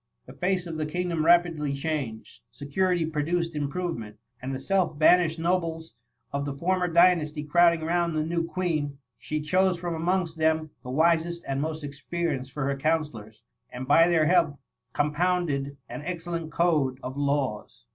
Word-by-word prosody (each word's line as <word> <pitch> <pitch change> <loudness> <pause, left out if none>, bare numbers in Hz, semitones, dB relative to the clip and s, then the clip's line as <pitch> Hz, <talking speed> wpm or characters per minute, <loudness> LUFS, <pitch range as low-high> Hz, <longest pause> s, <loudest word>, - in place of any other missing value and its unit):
The - - -12
face 185 0 -1
of 165 -2 -5
the 155 -1 -2
kingdom 175 0 -1
rapidly 165 -4 +3
changed 140 -7 -4
— - - -52
^security 165 +2 0
produced 170 +3 -1
improvement^and 135 -6 -5
the 130 - -3
self 185 0 0
banished 165 +1 +4
nobles 165 -1 -1 0.4
of 140 0 -1
the 140 -1 -4
former 180 +4 0
dynasty 165 -3 +3
crowding 170 +2 +4
round 170 0 0
the 155 0 0
new 165 +1 -1
Queen, 160 -4 -2 0.2
she 130 +7 -3
chose 185 +4 +2
from 170 0 -3
amongst 165 0 -1
them 160 -1 +1
the 125 - -9
wisest 170 +4 +1
and 135 0 -1
most 155 0 -3
experienced 140 -1 -3
for 145 -1 -3
her 140 0 -1
counsellors, 135 -8 -2 0.3
and 130 +1 -6
by 165 +4 +6
their 165 -3 +3
help 165 -4 +3 0.4
compounded 150 -2 0
an - - -7
excellent 170 -1 -4
code 150 -7 +1
of 130 +1 -5
laws. 140 -6 -2
160 Hz, 155 wpm, -26 LUFS, 145-175 Hz, 0.4 s, by